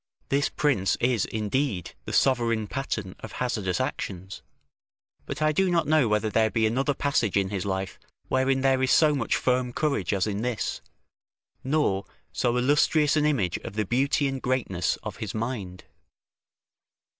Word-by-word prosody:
This 140 +1 +2
prince 125 -11 +1
is, 120 -4 +2
indeed, 110 - -2
the - - -5
sovereign 115 -4 +2
pattern 105 -5 -4
of - - -9
hazardous 105 -7 -1
actions; 95 -8 -4 0.9
but - - -3
I 155 - +4
do 190 +5 +2
not 170 -1 +2
know 155 -5 +3
whether 105 0 +1
there 110 0 +3
be 110 0 +1
another 135 +6 +1
passage 125 -9 +1
in 95 -1 +1
his 100 -1 -3
life 95 0 -3 0.3
wherein 130 0 +1
there 135 -1 +3
is 130 - +2
so 155 +1 +5
much 135 -5 0
firm 125 -1 +1
courage 140 - -1
as 95 -2 +1
in 105 -1 -2
this, 120 -2 -2 0.8
nor 130 -9 +1 0.3
so 120 0 +1
illustrious 150 +3 +3
an 150 -1 +3
image 110 - 0
of - - -8
the 110 0 0
beauty 140 +6 +1
and 135 -1 -3
greatness 115 -9 0
of - - -6
his 110 -1 -5
mind. 110 -6 -4
125 Hz, 160 wpm, -26 LUFS, 100-140 Hz, 0.9 s, so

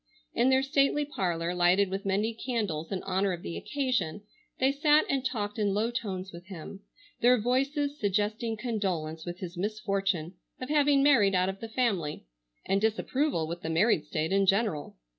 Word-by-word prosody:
In 240 +3 +3
their 265 0 +4
stately 275 +1 +2
parlor 175 - -2
lighted 180 +2 +3
with 195 +1 -3
many 205 +4 +1
candles 210 -10 -3
in 190 - -3
honor 190 0 0
of 175 - -7
the 170 - -5
occasion, 245 - -2 0.4
they 265 +1 +4
sat 295 +2 +4
and 270 -2 0
talked 215 -5 -3
in 200 -2 +1
low 225 +3 +1
tones 195 -6 -4
with 175 +2 -11
him, 190 +1 -8 0.4
their 245 0 +5
voices 275 +5 0
suggesting 215 +3 -1
condolence 185 -9 -3
with 175 +1 -6
his 180 -1 -6
misfortune 195 -4 -1 0.3
of 255 - -6
having 290 -2 +4
married 220 -9 +5
out 185 +1 +2
of 195 0 -5
the 225 - -7
family, 205 - -1 0.4
and 195 +1 +1
disapproval 220 - 0
with 170 +2 -6
the 160 - -4
married 165 0 +3
state 155 +2 -2
in 195 0 +3
general. 195 -6 0
205 Hz, 175 wpm, -29 LUFS, 180-250 Hz, 0.4 s, their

